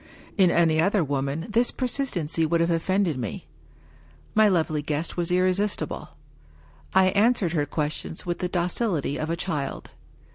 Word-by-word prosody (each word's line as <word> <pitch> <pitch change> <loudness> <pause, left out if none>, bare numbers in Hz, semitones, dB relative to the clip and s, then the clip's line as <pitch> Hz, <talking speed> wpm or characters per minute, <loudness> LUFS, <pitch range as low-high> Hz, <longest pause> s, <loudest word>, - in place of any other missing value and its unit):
In 190 -4 +5
any 160 -2 +3
other 195 +1 +2
woman 140 +2 -2
this 235 +2 +2
persistency 230 - -2
would 165 +1 +1
have 170 +1 +2
offended 170 -2 0
me. 115 -5 -5 0.9
My 215 0 +5
lovely 160 -5 +1
guest 150 +2 -3
was 175 -1 0
irresistible; 185 +3 0 0.9
I 190 0 +6
answered 205 -3 +2
her 145 -3 0
questions 155 +1 -3
with 175 -1 -2
the 180 - -2
docility 175 - -1
of 155 - -3
a 165 - 0
child. 150 -6 -4
170 Hz, 145 wpm, -25 LUFS, 155-190 Hz, 0.9 s, I